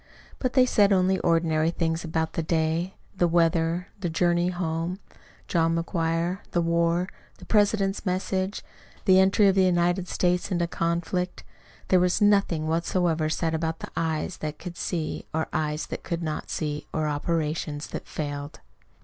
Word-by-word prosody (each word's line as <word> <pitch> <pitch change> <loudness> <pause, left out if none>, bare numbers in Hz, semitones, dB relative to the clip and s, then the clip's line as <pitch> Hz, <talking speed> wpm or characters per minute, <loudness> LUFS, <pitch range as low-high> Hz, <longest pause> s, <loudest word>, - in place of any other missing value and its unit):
But 255 -1 -1
they 255 -1 +6
said 205 -5 +4
only 190 0 +3
ordinary 165 -1 +2
things 165 -1 -1
about 160 -1 -1
the - - -1
day, 165 +3 0 0.2
the 175 -2 +3
weather, 165 +1 +1
the 180 -3 -2
journey 175 +1 +2
home, 175 0 -2 0.5
John 165 -1 +2
McGuire, 165 +1 -1
the 175 - +2
war, 170 +1 +1 0.3
the - - -13
President's 205 -2 +2
message, 190 +1 -1 0.4
the 190 -2 +6
entry 195 +2 +5
of 195 - +5
the 190 - +3
United 175 0 +2
States 180 +1 0
into 175 -2 +1
the - - 0
conflict. 170 +2 -2 0.5
There 185 - +5
was 180 +2 +2
nothing 200 -7 +3
whatever 165 -1 +1
said 160 +1 -1
about 160 0 -2
eyes 160 +1 -1
that 150 -1 -5
could 175 -1 -8
see 165 -3 -3
or 160 0 0
eyes 150 0 -1
that - - -6
could 170 0 -3
not 155 -1 -4
see, 150 -2 -3
or 155 -1 -1
operations 150 0 -2
that - - -6
failed. 145 -1 -5
170 Hz, 160 wpm, -26 LUFS, 160-185 Hz, 0.5 s, they